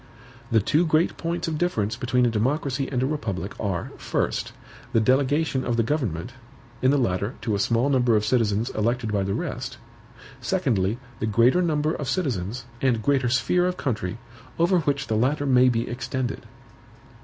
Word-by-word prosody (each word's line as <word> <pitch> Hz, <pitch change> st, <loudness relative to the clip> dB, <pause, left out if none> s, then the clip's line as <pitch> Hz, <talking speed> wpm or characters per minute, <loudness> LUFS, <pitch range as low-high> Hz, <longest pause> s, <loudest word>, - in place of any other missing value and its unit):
The 115 Hz, -, +5 dB
two 150 Hz, -, +2 dB
great 160 Hz, 0 st, +2 dB
points 170 Hz, +1 st, -3 dB
of 155 Hz, -2 st, -2 dB
difference 110 Hz, -, 0 dB
between 125 Hz, 0 st, +1 dB
a -, -, +3 dB
democracy 135 Hz, +4 st, 0 dB
and 125 Hz, -1 st, 0 dB
a -, -, +2 dB
republic 105 Hz, -, -3 dB
are: 95 Hz, -5 st, -2 dB
first, -, -, -2 dB, 0.4 s
the 115 Hz, -, +5 dB
delegation 135 Hz, +4 st, +2 dB
of 120 Hz, -1 st, -1 dB
the 115 Hz, -, +3 dB
government, 120 Hz, -, -2 dB, 0.5 s
in 130 Hz, -, +4 dB
the 145 Hz, -, +4 dB
latter, 100 Hz, -1 st, 0 dB
to 110 Hz, -, 0 dB
a 100 Hz, -, 0 dB
small 115 Hz, +5 st, +2 dB
number 125 Hz, -4 st, +3 dB
of 105 Hz, 0 st, +2 dB
citizens 110 Hz, -2 st, +1 dB
elected 115 Hz, +1 st, -1 dB
by 100 Hz, -, +2 dB
the 100 Hz, +1 st, -1 dB
rest; 130 Hz, -5 st, -4 dB, 0.6 s
secondly, 120 Hz, -, 0 dB, 0.2 s
the 110 Hz, -, -1 dB
greater 120 Hz, -, +4 dB
number 155 Hz, -2 st, +1 dB
of 145 Hz, -5 st, -4 dB
citizens, 120 Hz, -, -2 dB, 0.2 s
and 120 Hz, -5 st, +1 dB
greater 130 Hz, -2 st, +2 dB
sphere 155 Hz, +9 st, +2 dB
of 180 Hz, 0 st, -2 dB
country, 110 Hz, -6 st, -2 dB, 0.4 s
over 175 Hz, +2 st, +3 dB
which 140 Hz, -3 st, -1 dB
the 110 Hz, -, -1 dB
latter 135 Hz, +6 st, +1 dB
may 130 Hz, -2 st, +5 dB
be 115 Hz, 0 st, 0 dB
extended. 125 Hz, 0 st, -4 dB
125 Hz, 175 wpm, -25 LUFS, 110-145 Hz, 0.6 s, The